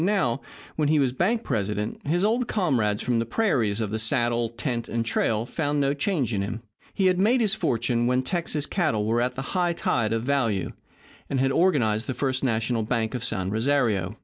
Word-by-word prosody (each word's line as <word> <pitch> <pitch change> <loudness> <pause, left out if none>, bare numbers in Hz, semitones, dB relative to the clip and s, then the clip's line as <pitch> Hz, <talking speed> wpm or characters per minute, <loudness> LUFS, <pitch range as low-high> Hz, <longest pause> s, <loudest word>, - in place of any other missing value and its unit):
Now, 175 - +1 0.4
when 150 -2 +2
he 155 +1 +3
was 135 -3 +2
bank 220 - +1
president, 105 +3 -3
his 175 +5 +1
old 230 +3 +1
comrades 120 - 0
from 120 -2 +1
the 115 - 0
prairies, 115 - +1
of 110 -3 -2
the 110 - -2
saddle, 120 0 +1
tent, 120 0 -4
and 115 0 -1
trail 110 -1 0
found 145 +2 -1
no 140 0 +2
change 145 - -1
in 100 - 0
him. 110 +3 -4 0.3
He 195 - 0
had 185 -1 +3
made 230 +6 +3
his 215 -4 +2
fortune 120 - 0
when 125 +1 +2
Texas 165 -2 -2
cattle 155 - 0
were 115 +2 +1
at 125 +1 -1
the 130 - -4
high 175 -2 +1
tide 115 -9 0
of 115 0 0
value, 120 -8 0 0.6
and 135 - 0
had 135 +1 +2
organized 120 - +2
the 130 - -2
First 130 -2 -1
National 115 -1 0
Bank 110 +1 -1
of 125 -2 -3
San 95 -5 -2
Rosario. 110 -5 0
125 Hz, 200 wpm, -25 LUFS, 110-155 Hz, 0.6 s, he